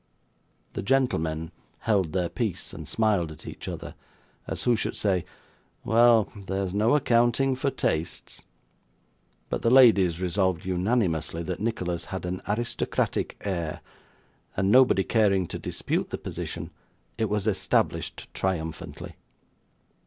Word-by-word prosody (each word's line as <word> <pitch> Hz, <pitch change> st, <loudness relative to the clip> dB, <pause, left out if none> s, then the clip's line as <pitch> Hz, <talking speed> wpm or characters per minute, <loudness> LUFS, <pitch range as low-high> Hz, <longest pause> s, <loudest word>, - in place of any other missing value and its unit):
The -, -, -3 dB
gentleman 80 Hz, -10 st, 0 dB, 0.3 s
held 100 Hz, -7 st, +1 dB
their 90 Hz, -2 st, 0 dB
peace, 110 Hz, -1 st, -3 dB
and -, -, -8 dB
smiled 105 Hz, -8 st, +1 dB
at 75 Hz, -, -12 dB
each -, -, -8 dB
other, -, -, -6 dB, 0.5 s
as -, -, -4 dB
who 120 Hz, -, +4 dB
should 110 Hz, -, -2 dB
say, 95 Hz, -4 st, +1 dB, 0.6 s
'Well! 115 Hz, -1 st, +5 dB, 0.2 s
there's 95 Hz, -1 st, -2 dB
no 110 Hz, +6 st, +3 dB
accounting 125 Hz, 0 st, +3 dB
for 135 Hz, +2 st, 0 dB
tastes;' 80 Hz, -, -3 dB, 1.0 s
but -, -, -1 dB
the 115 Hz, -, +3 dB
ladies 105 Hz, -10 st, +6 dB
resolved 95 Hz, -1 st, 0 dB
unanimously 90 Hz, -4 st, 0 dB
that 90 Hz, +1 st, -4 dB
Nicholas 90 Hz, -6 st, -2 dB
had 95 Hz, -2 st, -5 dB
an 90 Hz, +1 st, -3 dB
aristocratic 115 Hz, +4 st, -1 dB
air; 85 Hz, -5 st, -2 dB, 0.8 s
and 95 Hz, +1 st, +2 dB
nobody 125 Hz, -5 st, +6 dB
caring 100 Hz, -5 st, +2 dB
to -, -, -5 dB
dispute -, -, -2 dB
the -, -, -3 dB
position, -, -, -5 dB, 0.5 s
it 110 Hz, -2 st, +1 dB
was 105 Hz, -1 st, 0 dB
established 105 Hz, -4 st, 0 dB
triumphantly. 80 Hz, -4 st, -4 dB
95 Hz, 125 wpm, -27 LUFS, 90-115 Hz, 1.0 s, ladies